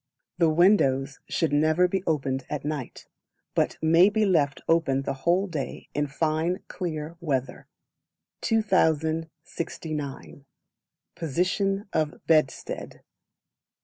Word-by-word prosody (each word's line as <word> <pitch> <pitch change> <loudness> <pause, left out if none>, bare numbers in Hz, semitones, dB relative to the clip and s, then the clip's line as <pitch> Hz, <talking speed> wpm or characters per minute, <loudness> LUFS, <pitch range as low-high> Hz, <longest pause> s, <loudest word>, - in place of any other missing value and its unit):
The 165 -2 +5
Windows 145 -6 +3
should 160 -3 0
never 155 +4 +4
be 190 +1 -1
opened 135 -4 0
at 150 -1 -4
night, 150 -5 -5 0.5
but - - +1
may 165 +4 +6
be 215 0 +1
left 150 -7 +2
open 150 -5 +2
the 135 - -2
whole 170 +8 +1
day 160 -8 -5
in 145 0 0
fine 160 +5 -1
clear 165 -2 -5
weather. 135 -6 -3 0.7
2069. 160 - -1 0.7
Position 190 +5 -1
of 155 -1 -1
Bedstead. 155 -4 0
160 Hz, 105 wpm, -26 LUFS, 145-175 Hz, 0.7 s, may